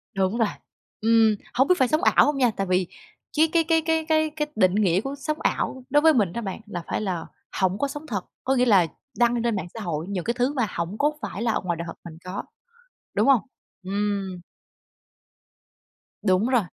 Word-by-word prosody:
Đúng 195 +3 +1
rồi. 225 -3 +3 0.5
Ừm, 225 -1 +4 0.2
hông 265 +3 +3
biết 365 - +5
phải 260 - +3
sống 310 +7 +1
ảo - - +5
hông 295 -1 0
nha, 245 -4 +3
tại 195 -1 -1
vì 180 -1 +1 0.5
cái 320 - +6
cái 335 - +4
cái 325 -1 +3
cái 320 0 0
cái 315 -1 +2
cái 300 -1 -1
định 185 -2 +3
nghĩa 195 -3 +3
của 270 +2 -5
sống 305 +2 -3
ảo 260 - -1
đối 295 +2 +4
với 320 0 +6
mình 205 - +1
đó 235 - -3
bạn 195 -4 -5
là 180 -5 -6
phải - - -2
là 180 -5 -3 0.3
hổng 190 0 +2
có 280 - 0
sống 295 +3 -8
thật. 205 -8 -2 0.2
Có 265 - +1
nghĩa 250 -1 +3
là 195 -8 +5 0.3
đăng 240 0 +3
lên 235 -1 0
mạng 180 -3 -3
xã 230 - -7
hội 165 -6 -3
những 190 -3 -2
cái 235 - 0
thứ 250 +3 0
mà 245 -6 0
hổng 170 +5 -3
có 295 +4 +2
phải 200 - -5
là 230 -2 +1
ngoài 175 -2 -2
đời 170 - -4
thật 165 - -7
mình 160 - -12
có, 185 +2 -5 0.7
đúng - - +2
hông? 270 -5 +6 0.4
Ừm. 195 -1 -2 1.8
Đúng 190 +2 +2
rồi. 250 -2 +3
225 Hz, 220 wpm, -24 LUFS, 190-270 Hz, 1.8 s, cái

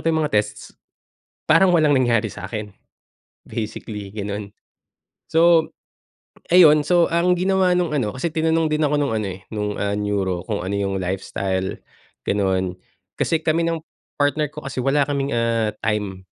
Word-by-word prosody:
yung 160 -1 +1
mga 150 - -3
tests, 105 0 -1 0.7
parang 170 +4 +5
walang 155 -4 +4
nangyari 115 -5 +2
sakin, 105 +2 -6 0.7
basically 105 -2 -6
ganon. 105 -1 -5 0.8
So, 165 0 +4 0.8
ayun, 155 -4 +7
so 175 +1 +3
ang 170 +2 +2
ginawa 185 0 +2
nung 175 -4 +1
ano, 110 -7 -1
kasi 130 +6 -2
tinanong 160 0 +1
din 155 0 +1
ako 150 0 +1
nung 140 -5 0
ano 110 - -2
eh, 95 - -11
nung 105 -1 -3
ah, 100 0 -1
neuro 100 -4 -1
kung 105 -5 -3
ano 95 +3 -3
yung 95 -1 -1
lifestyle, 95 +1 -3 0.5
ganon, 95 -2 0 0.4
kasi 165 - 0
kami 160 +1 +1
ng, 165 -1 -1 0.4
partner 145 +1 +2
ko 150 - -7
kasi 135 -1 -6
wala 140 +2 +3
kaming 140 -1 -1
ah, 115 -2 +1
time. 105 -3 -2
120 Hz, 150 wpm, -21 LUFS, 100-160 Hz, 0.8 s, ayun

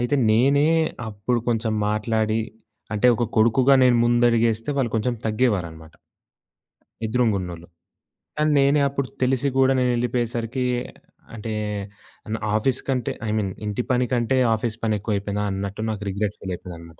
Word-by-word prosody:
అయితే 120 +3 0 0.2
నేనే 140 +6 +4 0.4
అప్పుడు 110 +4 -1
కొంచెం 110 -1 0 0.2
మాట్లాడి 110 +1 0 0.5
అంటే 105 +3 +2
ఒక 120 - 0
కొడుకుగా 120 +5 +5
నేను 125 -1 +5
ముందడుగేస్తే 115 0 +2
వాళ్ళు 125 -4 0
కొంచెం 120 +3 0
తగ్గేవారనమాట. 90 -9 -1 1.1
ఎదురుంగున్నోళ్ళు. 100 -8 -1 0.7
కానీ 150 0 +2
నేనే 140 +2 +4
అప్పుడు 140 -1 -3
తెలిసి 130 +1 +1
గూడా 135 0 +4
నేనేళ్ళిపోయేసరికి 120 0 -1 0.7
అంటే 110 0 -5 0.8
న - - -1 0.2
ఆఫీస్ 125 +4 +1
కంటే, 125 -3 0 0.2
ఐమీన్ 105 -2 -1
ఇంటి 105 +3 -2
పని 125 0 +2
కంటే 120 +2 +1 0.2
ఆఫీస్ 110 0 -3
పని 110 -1 +1
ఎక్కువ 105 +1 -2
అయిపోయిందా, 100 +1 -3
అన్నట్టు 100 +2 -4
నాకు 105 -1 -5
రిగ్రెట్ 100 +1 -2
ఫీల్ 95 - -5
అయిపోయిందన్నమాట. 85 -2 -11
115 Hz, 130 wpm, -23 LUFS, 105-125 Hz, 1.1 s, కొడుకుగా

